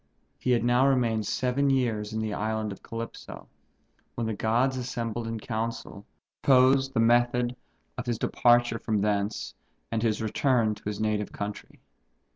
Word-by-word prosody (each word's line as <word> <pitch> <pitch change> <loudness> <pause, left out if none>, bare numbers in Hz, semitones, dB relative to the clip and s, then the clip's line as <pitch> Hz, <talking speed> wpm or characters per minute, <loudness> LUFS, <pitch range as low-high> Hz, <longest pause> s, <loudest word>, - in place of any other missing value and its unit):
He - - -3
had 120 -2 +3
now 120 +2 +4
remained 115 -5 +1
seven 130 +2 +1
years 115 -6 0
in 110 0 -2
the 110 -1 -2
Island 110 0 -2
of 100 - -9
Calypso, 115 0 -8 0.7
when 120 - -2
the 110 - -1
gods 120 +6 +1
assembled 120 -2 -3
in 115 -1 -4
council, 115 -2 -5 0.3
proposed 135 0 +4
the - - +2
method 120 +1 +3 0.4
of 125 - -5
his 120 -2 0
departure 120 0 +3
from 110 -3 -1
thence 105 0 -1 0.4
and 110 - 0
his 110 -2 +1
return 115 0 +1
to - - -13
his 105 0 -3
native 105 -1 -1
country. 105 0 -7
115 Hz, 155 wpm, -27 LUFS, 110-125 Hz, 0.7 s, now